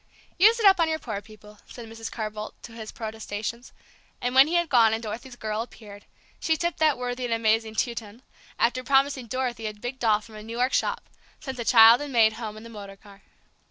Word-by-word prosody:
"Use 445 +5 +6
it 445 - +1
up 385 -2 +7
on 330 -1 +3
your 315 - 0
poor 215 -9 -5
people," 210 -1 -16
said 235 -2 -10
Mrs. 225 0 -8
Carr 215 -2 -4
Boldt, 215 0 -7
to 235 - -10
his 225 -1 -8
protestations; 220 +1 -6 0.5
and 245 0 -2
when 265 +2 +7
he 340 - -1
had 345 -1 +2
gone, 230 -6 +4
and 225 - -7
Dorothy's 235 +4 -7
"girl" 215 -2 -3
appeared, 205 -3 -11 0.3
she 320 -1 +1
tipped 345 +1 -2
that 310 -3 +3
worthy 250 0 -4
and 240 -2 -1
amazed 225 0 +1
Teuton, 235 -3 -2
and 225 +5 -18 0.4
after 250 +2 +1
promising 270 -1 +2
Dorothy 245 -2 -3
a 215 - -6
big 245 +5 -7
doll 215 -3 +3
from 220 +1 -16
a 215 - -9
New 225 +2 -7
York 250 +2 +1
shop, - - 0 0.4
sent 265 -1 -6
the 240 - -4
child 230 +2 +7
and 290 -1 -5
maid 225 -3 +4
home 220 -1 -7
in 215 - -11
the - - -10
motor 205 -3 -10
car. 200 0 -17
230 Hz, 230 wpm, -25 LUFS, 215-255 Hz, 0.5 s, up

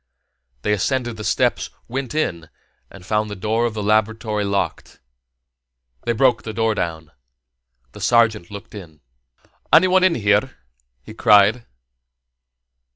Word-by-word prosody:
They 105 - +1
ascended 120 +3 -1
the 110 - -7
steps, - - 0 0.2
went 130 +1 -5
in, 85 - -2 0.4
and 95 -2 -14
found 105 +1 -1
the 105 - -6
door 110 +4 0
of 110 - -6
the 105 - -3
laboratory 110 0 0
locked. 100 -1 -3 1.1
They 120 - +1
broke 120 0 +2
the 110 - -7
door 115 0 +1
down. 80 -5 -4 0.8
The - - -12
sergeant 110 -6 +2
looked 100 -1 -10
in. 85 -7 -11 0.7
"Anyone 185 +1 +5
in 185 -2 +4
here?" 105 +4 +1 0.5
he 110 - -11
cried. 105 +2 +4
110 Hz, 130 wpm, -20 LUFS, 100-120 Hz, 1.1 s, Anyone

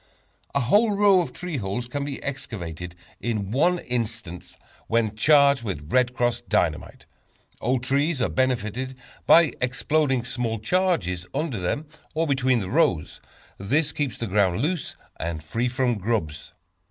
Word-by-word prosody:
A 140 - +3
whole 205 - +3
row 200 -3 +5
of 170 - -4
tree 180 -4 -5
holes 105 +2 -3
can 140 +4 -4
be 140 -1 -5
excavated 90 - -5 0.2
in 105 -4 -2
one 170 +8 +3
instant 115 - -4 0.3
when 110 -2 +1
charged 140 +2 +5
with 85 -9 -5
"Red 125 -1 +3
Cross" 120 -1 0
Dynamite. - - -1 0.6
Old 125 +1 0
trees 140 +3 +1
are 115 - +2
benefited 130 0 -1 0.3
by 165 -5 +6
exploding 130 +1 +1
small 120 -2 -2
charges 110 - 0
under 145 -9 -1
them, 120 - -2 0.3
or 165 +1 +1
between 130 -4 +2
the 95 - -5
rows. 145 - +1 0.4
This 145 +10 +1
keeps 145 -4 -2
the 115 - -3
ground 95 -3 +2
loose, 160 +5 -2 0.2
and 80 -1 -4
free 115 +10 -1
from 125 -3 0
grubs. 80 -9 -2
125 Hz, 145 wpm, -24 LUFS, 105-145 Hz, 0.6 s, by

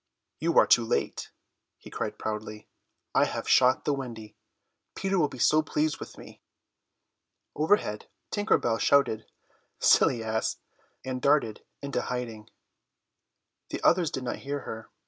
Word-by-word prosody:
"You 165 +2 0
are - - +8
too 120 - +5
late," 70 -11 -2 0.5
he - - -14
cried - - -4
proudly, 105 0 -5 0.5
"I - - +4
have - - -4
shot 130 0 +4
the 145 - +2
Wendy. 115 -6 -7 0.6
Peter 195 -1 0
will 150 - +3
be 130 - -10
so 155 +5 +4
pleased 155 0 -1
with - - -9
me." - - -13 1.1
Overhead 150 - +1 0.2
Tinker 205 +1 +2
Bell 115 -1 -1
shouted 130 -6 +2 0.5
"Silly 115 - +4
ass!" 110 0 -1 0.5
and 130 -1 -4
darted 140 -7 +2 0.2
into 140 -1 -2
hiding. 115 -4 -5 1.2
The - - -4
others 170 -2 +4
did 130 - -5
not 120 - -3
hear 140 0 -4
her. 110 0 -8
125 Hz, 140 wpm, -28 LUFS, 110-150 Hz, 1.2 s, are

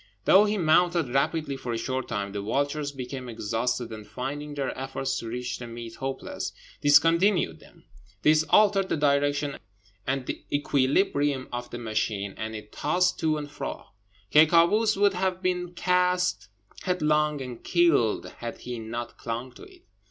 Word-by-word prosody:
Though 200 +3 +7
he 210 0 0
mounted 170 -3 +3
rapidly 140 +1 0
for 125 -3 -4
a - - -1
short 130 +3 -3
time, 100 -3 -3
the 100 0 -4
vultures 140 +7 -1
became 130 -1 -6
exhausted, 115 +1 -2
and 110 -1 -9
finding 145 +5 -5
their 140 -2 -2
efforts 135 0 -3
to 115 - -7
reach 125 +2 -4
the 120 - -7
meat 115 -1 -8
hopeless, 135 0 -4 0.3
discontinued 165 - +4
them; - - -19 0.4
this 155 0 +5
altered 200 -2 +4
the - - 0
direction 145 0 +1 0.5
and 130 0 -1 0.2
equilibrium 145 -1 +1
of 120 0 -4
the 120 - -6
machine, 110 -3 -2
and 110 0 -5
it 105 0 -9
tossed 180 +4 +1
to 155 -1 +1
and 145 -1 -6
fro. 140 -2 -6 0.4
Ky 155 +1 +7
Kâoos 195 +7 +4
would 200 0 +4
have 185 0 -1
been 180 -1 -1
cast 180 - +1 0.3
headlong 150 -4 +1
and 125 -3 -7
killed 165 -11 +3
had 120 -1 -6
he 125 -1 -5
not 115 +2 -6
clung 120 +3 -4
to - - -16
it. 370 -2 -18
140 Hz, 160 wpm, -27 LUFS, 120-170 Hz, 0.5 s, Though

